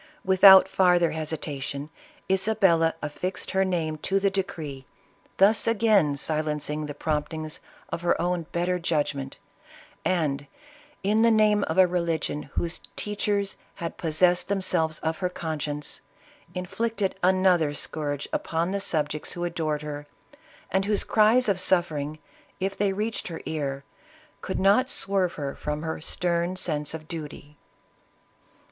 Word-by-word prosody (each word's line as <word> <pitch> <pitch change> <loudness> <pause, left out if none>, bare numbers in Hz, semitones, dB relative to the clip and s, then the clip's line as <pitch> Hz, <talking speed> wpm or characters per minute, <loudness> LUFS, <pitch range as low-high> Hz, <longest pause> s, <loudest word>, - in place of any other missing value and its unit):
Without 190 0 +8
farther 180 -2 +3
hesi 160 0 -2
tation, 140 0 -5 0.4
Isabella 190 -4 +3
affixed 165 +5 -3
her 190 0 +2
name 165 -5 -1
to 195 +5 +1
the 200 0 +1
decree, 155 -9 -4 0.5
thus 205 +3 +4
again 210 -10 +3
silencing 150 0 -1
the 145 - -6
promptings 155 +1 -3 0.3
of - - -4
her 175 - +1
own 175 -2 -1
better 180 +1 0
judg 155 -4 0
ment, 135 -1 -7 0.7
and 145 -6 0 0.6
in 210 +3 +2
the 230 - +5
name 215 -2 +4
of 160 - -3
a 185 - +8
religion 170 -4 -1
whose 170 -1 -2
teachers 205 -1 -1 0.2
had 170 -1 -5
possessed 175 +2 +2
themselves 180 -5 0
of 160 0 -2
her 180 - 0
conscience, 150 -4 -3 0.5
inflicted 200 +2 -2
an 185 +1 +3
other 170 -5 +4
scourge 145 -1 -3
upon 165 +2 -1
the 200 - -1
subjects 155 -6 -1
who 175 - -4
adored 160 -3 -2
her, 145 -1 -6 0.6
and 190 0 +1
whose 205 0 +2
cries 225 +3 +4
of 195 -3 +1
suffering, 155 -5 +1 0.4
if 195 +1 -2
they 200 -1 +1
reached 215 +3 -3
her 165 -3 -7
ear, 140 -3 -3 0.6
could 190 - -3
not 205 +7 +4
swerve 195 -3 +1
her 140 -2 -4
from 150 +1 -4
her 160 -1 -4
stern 175 +2 -1
sense 155 -4 -2
of 155 -1 -9
duty. 150 -2 -8
170 Hz, 140 wpm, -26 LUFS, 150-190 Hz, 0.7 s, Without